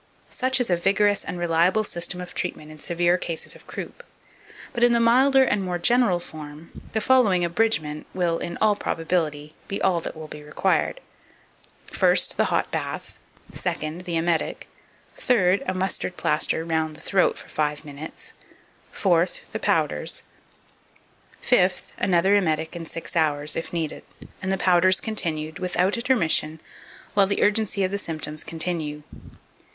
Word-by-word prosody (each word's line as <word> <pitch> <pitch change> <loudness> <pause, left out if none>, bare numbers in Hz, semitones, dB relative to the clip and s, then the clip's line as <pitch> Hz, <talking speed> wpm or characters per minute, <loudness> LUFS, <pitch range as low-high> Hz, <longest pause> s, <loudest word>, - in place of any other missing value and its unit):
Such 260 +1 +1
is 245 -6 0
a 175 - +3
vigorous 200 +3 +2
and 180 - -5
reliable 175 +4 +2
system 180 -1 -1
of 180 - -8
treatment 155 0 -4
in 155 - -12
severe 175 +3 +1
cases 165 -2 -3
of - - -17
croup; - - -7 0.7
but, 240 - 0
in 240 0 +6
the 235 - +3
milder 265 +4 +5
and 210 -6 +1
more 180 -1 -2
general 220 -1 +3
form, 155 -1 -10 0.2
the 220 - +1
following 210 -7 +3
abridgment 170 -5 0
will, 175 -2 0
in 170 - -5
all 215 -1 +4
probability, 160 -5 -2
be 195 - -3
all 180 -3 +2
that - - -6
will 155 0 -8
be 150 - -9
required: 150 - 0 0.9
First, - - +3
the - - +3
hot - - 0
bath; - - -5 0.3
second, 170 0 -3
the 170 -3 -1
emetic; 165 0 -1 0.5
third, 195 -6 +3
a 185 - -1
mustard 185 -1 -1
plaster 155 +1 +1
round 160 -1 -1
the - - -12
throat 190 -2 +2
for - - -10
five 150 0 -2
minutes; 145 +2 -8 0.6
fourth, 175 -2 +1
the - - -4
powders; - - 0 1.2
fifth, 185 -7 +2
another 190 +2 +3
emetic 160 -4 0
in 165 -1 -6
six 165 +2 -4
hours, 150 -2 +1
if 165 - -4
needed, 165 -3 -3 0.4
and 190 - -2
the 190 - +1
powders 185 0 +4
continued 160 -8 -2
without 180 +1 +1
intermission 170 -10 +1 0.5
while 200 -1 +4
the 200 - +1
urgency 210 -2 +2
of 185 - 0
the 200 - -1
symptoms 155 -3 -3
continues. 160 -3 -3
175 Hz, 155 wpm, -24 LUFS, 160-200 Hz, 1.2 s, in